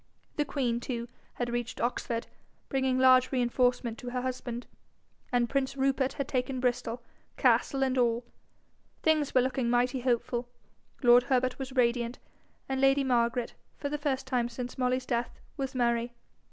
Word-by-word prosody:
The 295 - +1
queen, 250 -5 -1
too, 240 -1 -4 0.3
had 240 -1 -2
reached 240 -1 -3
Oxford, 235 -1 -1 0.4
bringing 265 -1 +1
large 255 0 +5
reinforcement 245 -2 +1
to 245 - -6
her 250 0 -2
husband, 250 -2 -4 0.7
and 245 -1 +2
prince 275 +1 -1
Rupert 270 0 +1
had 275 - -3
taken 260 0 -1
Bristol, 245 -1 -1 0.3
castle 270 -2 +3
and 260 -1 +1
all. 240 0 +1 0.8
Things 310 -4 +2
were 255 - +7
looking 255 -1 0
mighty 245 +2 +2
hopeful, 245 0 -1 0.5
lord 240 0 +8
Herbert 255 -1 +1
was 265 -1 -5
radiant, 240 -1 +1 0.5
and 265 0 -1
lady 270 +1 +4
Margaret, 240 -2 +1 0.2
for 285 - -3
the 295 +1 -3
first 270 -2 -1
time 250 -2 0
since 245 0 -6
Molly's 255 0 0
death, 240 -1 -2 0.2
was 270 -1 -4
merry. 235 -1 +1
250 Hz, 155 wpm, -29 LUFS, 240-265 Hz, 0.8 s, lord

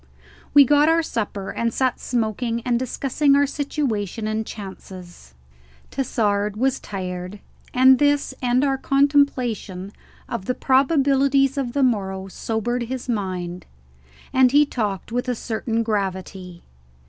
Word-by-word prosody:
We 285 -1 +9
got 295 +3 +4
our 330 0 +3
supper 205 -7 -4
and 230 +3 -1
sat 255 +1 0
smoking 230 0 -2
and 240 0 0
discussing 275 +3 +1
our 285 0 +4
situation 245 - -3
and 215 0 -2
chances. 185 - -10 0.6
Tassard 210 -5 0
was 265 +3 +1
tired, 185 0 -6 0.3
and 260 +1 +6
this 290 -2 +2
and 250 +1 +2
our 270 -2 +1
contemplation 255 -10 +1 0.3
of 230 -6 -5
the 250 - -1
probabilities 275 0 +3
of 260 -4 -2
the 280 - +1
morrow 190 -6 0
sobered 230 +5 -2
his 260 -1 -5
mind, 185 -6 -3 0.7
and 260 -1 +5
he 295 +2 +5
talked 210 -7 -3
with 245 +2 -2
a 250 - 0
certain 230 0 -2
gravity. 190 -4 -4
240 Hz, 130 wpm, -22 LUFS, 200-270 Hz, 0.7 s, We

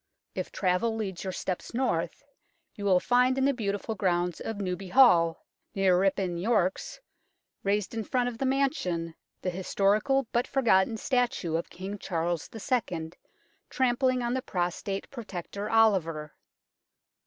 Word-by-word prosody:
If - - -4
travel 190 +4 +1
leads 195 -5 -4
your 190 - -3
steps 185 +4 -4
north, 245 -4 -1 0.5
you 205 -2 -7
will 185 -2 +5
find 250 +5 +3
in 265 - +2
the 280 - +3
beautiful 210 -2 -2
grounds 180 -4 0
of 225 - -4
Newby 185 -1 -3
Hall, 175 -7 +5 0.3
near 195 -2 +4
Ripon, 185 -2 +1
Yorks, 190 -2 0 0.6
raised 200 +1 0
in 225 -1 -2
front 245 +2 0
of 240 -2 -5
the 270 - 0
mansion, 220 - 0 0.3
the 185 - 0
his 185 +1 -6
torical 215 +7 +2
but 240 +1 +1
forgotten 225 -5 +3
statue 240 - 0
of 165 - -2
King 195 +3 -6
Charles 170 -2 -2
II. 195 -9 -2 0.6
trampling 255 -1 +1
on 240 0 0
the 260 - 0
prostrate 185 0 -3
Protector 205 -4 -6
Oliver. 180 -9 +2
200 Hz, 140 wpm, -28 LUFS, 180-240 Hz, 0.6 s, will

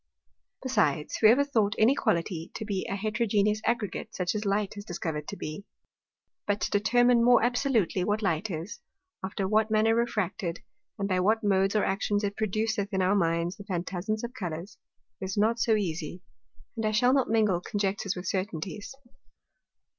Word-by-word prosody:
Besides, 150 - +1
whoever 230 +6 +6
thought 220 -7 +1
any 225 +5 +5
Quality 170 - -1
to 220 - -4
be 200 -3 -2
a - - -1
heterogeneous 210 0 +1
Aggregate, 225 -4 -2
such 180 -1 -1
as 210 0 -3
Light 200 0 0
is 205 - -7
discovered 160 -6 -4
to - - -6
be? 155 +6 -6 0.8
But 205 0 +1
to - - -1
determine 240 +3 +4
more 245 -1 +5
absolutely, 240 - +1
what 210 +3 0
Light 185 +2 0
is, 165 +2 -5 0.4
after 190 0 -2
what 215 +2 +2
manner 220 +1 +3
refracted, 205 -7 -1 0.3
and 200 -2 -1
by 185 -2 +1
what 220 +5 +2
Modes 195 0 +2
or 210 - +3
Actions 205 +2 0
it 200 0 -1
produceth 215 0 -1
in 190 -1 +1
our 185 +2 +3
Minds 170 -1 0
the 200 - -9
Phantasms 190 +3 -3
of 235 +1 -5
Colours, 175 -4 -6 0.4
is 190 +2 -4
not 225 +3 +2
so 230 -1 +3
easie. 175 -3 -3 0.5
And 225 - -3
I 215 - +1
shall 245 +4 +4
not 270 -2 +2
mingle 210 -6 +2
Conjectures 200 0 -2
with 180 0 -6
Certainties. 190 +4 -4
205 Hz, 170 wpm, -28 LUFS, 185-220 Hz, 0.8 s, whoever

